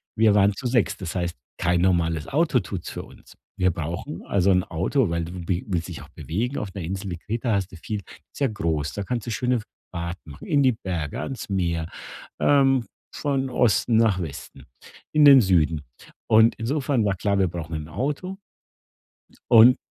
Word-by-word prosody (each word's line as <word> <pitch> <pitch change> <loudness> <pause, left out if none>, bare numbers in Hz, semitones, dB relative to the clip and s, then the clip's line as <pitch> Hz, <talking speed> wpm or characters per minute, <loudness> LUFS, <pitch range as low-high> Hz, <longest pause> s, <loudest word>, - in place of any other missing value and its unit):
Wir 110 -1 +4
waren 100 0 +4
zu 125 +4 -4
sechst. 120 -5 +1
Das 90 -1 -5
heißt, 85 -2 -2 0.2
kein 90 0 +1
normales 85 -4 +1
Auto 150 -3 +2
tut's 95 -3 -6
für - - -5
uns. - - -16 0.2
Wir 95 -1 +3
brauchen 85 - -5
also 100 0 +2
'n 90 -1 +3
Auto, 95 - 0
weil 85 0 -1
du 85 0 -8
wi 90 0 -1
willst 85 -3 -1
dich - - -7
auch - - -15
bewegen. 120 - -3
Auf 105 - -4
’ner 95 - -5
Insel 95 +4 -4
wie 85 - -4
Kreta 115 +5 -2
hast 100 -2 -1
du 90 - -10
viel 105 +5 -4 0.3
ist - - -11
ja 140 - +3
groß. 80 - -2
Da 100 - -4
kannst 120 +1 -3
du 115 - -2
schöne 125 +1 0 0.3
Fahrten 85 -1 -6
machen, 70 - -11
in 145 -2 +3
die 130 -2 +4
Berge, 85 -8 -4
ans 135 -6 -6
Meer, 85 -4 -1 0.5
ähm, 135 -4 +4 0.3
von 135 -2 -1
Osten 120 -1 +2
nach 110 -4 +3
Westen, 75 -4 -8 0.5
in 150 -1 +6
den 140 -2 +9
Süden. 85 -6 +2 0.5
Und 110 +1 +6
insofern 135 +1 0
war 100 -1 +1
klar, 100 +2 0
wir 95 - +3
brauchen 85 -1 -6
'n 75 -1 -5
Auto 145 - -3 1.1
und 120 +2 +8
100 Hz, 190 wpm, -24 LUFS, 85-125 Hz, 1.1 s, den